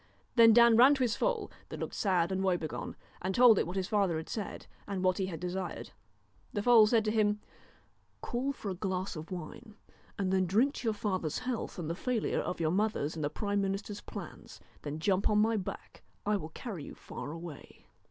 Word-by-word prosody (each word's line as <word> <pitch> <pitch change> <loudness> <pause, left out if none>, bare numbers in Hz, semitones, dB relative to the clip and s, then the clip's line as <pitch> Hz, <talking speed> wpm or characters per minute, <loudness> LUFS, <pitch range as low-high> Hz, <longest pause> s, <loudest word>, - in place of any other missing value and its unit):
Then 230 -2 +8
Dan 235 0 +7
ran 265 +4 +8
to 265 - 0
his 235 -3 +1
foal, 485 -5 -1 0.2
that - - -6
looked - - -4
sad 185 -4 +1
and 190 0 -1
woebegone, 175 -5 -2 0.3
and 190 +1 -2
told 240 -4 +7
it - - 0
what 175 - -5
his 190 -1 -1
father 195 -6 +1
had 160 - -6
said, 210 -3 -5 0.2
and 195 -2 -3
what 185 0 +2
he 190 - 0
had 165 -4 -5
desired. 180 +1 -4 0.6
The 205 - -1
foal 230 -3 +7
said 225 0 +3
to 215 - +1
him: 210 -1 +2 0.4
' - - -39
Call 255 +3 -1
for 215 -7 -5
a - - -2
glass 185 0 -3
of 155 +1 -7
wine, 185 +5 -8 0.4
and 190 -2 +1
drink 240 +9 +3
to - - -7
your 220 - +1
father's 185 -7 -2
health 250 -4 -4
and 170 -4 -4
the 165 - -1
failure 230 +5 -1
of - - -3
your 160 -1 +1
mother's 195 -6 0
and 155 - -4
the 145 - +1
prime 205 +3 -1
minister's 200 +1 -3
plans; - - -9 0.2
then 150 0 -5
jump 190 +3 +1
on 210 - +3
my 220 +2 +3
back, 195 -4 -6 0.2
I 210 +1 +2
will 160 -6 -4
carry 185 - -7
you - - -9
far 125 - -8
away.' 165 -2 -10
195 Hz, 210 wpm, -31 LUFS, 180-220 Hz, 0.6 s, Then